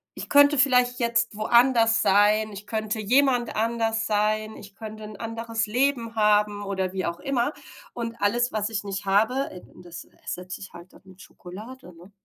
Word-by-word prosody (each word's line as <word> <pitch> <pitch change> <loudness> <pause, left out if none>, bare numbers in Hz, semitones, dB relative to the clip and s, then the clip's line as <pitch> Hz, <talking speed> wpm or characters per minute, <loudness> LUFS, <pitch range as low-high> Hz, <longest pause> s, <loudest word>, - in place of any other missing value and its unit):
ich - - -8
könnte 285 0 +5
vielleicht 250 -2 +3
jetzt 235 -1 0
woanders 230 +1 +3
sein, 210 +2 +3
ich 205 +1 -10
könnte 215 0 -3
jemand 245 +2 +2
anders 225 0 0
sein, 215 +1 0
ich 200 -1 -13
könnte 215 0 -9
'n 210 -1 -9
anderes 225 0 -3
Leben 240 0 0
haben 210 -1 +2
oder 190 -2 -3
wie 190 -2 -2
auch 170 0 -4
immer. 270 0 -1 0.4
Und 230 -1 -5
alles, 240 +4 +1
was 215 0 -2
ich 210 -2 -3
nicht 200 0 -5
habe 220 +8 +1
eben 180 - -14
das 170 -1 -10
ersetze 180 +1 -8
ich 195 - -8
dann 170 - -11
halt 180 - -20
dann - - -18
mit 185 -1 -17
Schokolade, 215 +7 -11
ne? 180 +4 -16
215 Hz, 180 wpm, -25 LUFS, 205-235 Hz, 0.4 s, könnte